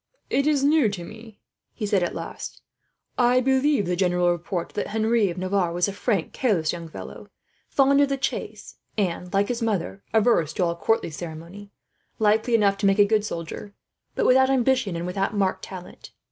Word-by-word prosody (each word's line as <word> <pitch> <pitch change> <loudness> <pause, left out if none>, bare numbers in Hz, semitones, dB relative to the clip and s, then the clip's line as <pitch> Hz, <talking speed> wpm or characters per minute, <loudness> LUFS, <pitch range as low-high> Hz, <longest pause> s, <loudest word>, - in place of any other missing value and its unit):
"It 275 +2 +2
is 290 -3 +2
new 290 -5 +4
to 195 -4 -6
me," 220 +3 -12 0.4
he 215 - -4
said 200 -2 +1
at 175 - -2
last. - - -7 0.6
"I 245 +1 +4
believed 265 -2 +2
the 180 +1 -1
general 180 -1 +2
report 175 0 -3
that - - -3
Henry 220 -1 +1
of 175 - -6
Navarre 185 -1 0
was 175 +2 +1
a 200 - -4
frank, 205 -4 -1
careless 185 -12 +1
young 170 -1 -7
fellow, - - -10 0.4
fond 275 +1 +4
of 285 - +3
the 275 - 0
chase, 270 - -4 0.2
and, 180 -3 -2
like 200 +1 +2
his 245 -1 -2
mother, 200 -3 -2
averse 220 -8 +2
to 185 - 0
all 170 -1 0
court 225 +6 +1
ceremony; 170 +5 -8 0.5
likely 220 +2 +2
enough 200 -3 +2
to 200 - +2
make 195 +1 +3
a 205 - +6
good 215 0 +2
soldier, 200 +2 -6 0.4
but - - 0
without 265 +1 +5
ambition, 255 -7 +1
and 170 +1 -3
without 195 +3 -2
marked 190 -1 0
talent. 185 -2 -10
205 Hz, 190 wpm, -24 LUFS, 180-235 Hz, 0.6 s, a